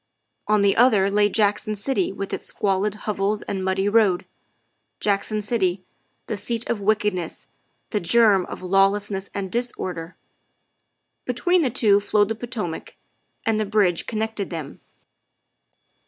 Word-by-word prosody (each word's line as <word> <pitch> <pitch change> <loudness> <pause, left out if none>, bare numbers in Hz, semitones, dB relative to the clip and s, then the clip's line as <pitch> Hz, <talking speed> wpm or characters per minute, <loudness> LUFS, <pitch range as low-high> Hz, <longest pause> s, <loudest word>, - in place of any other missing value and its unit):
On 210 -1 +3
the 200 -1 +3
other 215 -5 +4
lay 205 0 +3
Jackson 210 0 +1
City 270 - -1
with 195 0 -6
its - - -5
squalid 200 +1 0
hovels 210 0 -1
and 190 -2 -4
muddy 190 +1 0
road 205 -4 +3 0.7
Jackson 210 +1 0
City, 190 -4 0 0.4
the 220 - -3
seat 230 +3 -2
of 220 -3 -2
wickedness, 205 -4 -1 0.5
the 210 - +1
germ 200 0 +4
of - - -8
lawlessness 195 +1 +1
and 195 -2 -3
disorder. 185 -8 -3 1.1
Between 345 +9 +2
the 275 - +1
two 215 -4 +4
flowed 205 0 +2
the 225 - -1
Potomac, 220 -7 -5 0.5
and 225 -1 +1
the - - +1
bridge 195 -5 +2
connected 220 -3 -3
them. 160 -5 -7
205 Hz, 135 wpm, -23 LUFS, 195-220 Hz, 1.1 s, other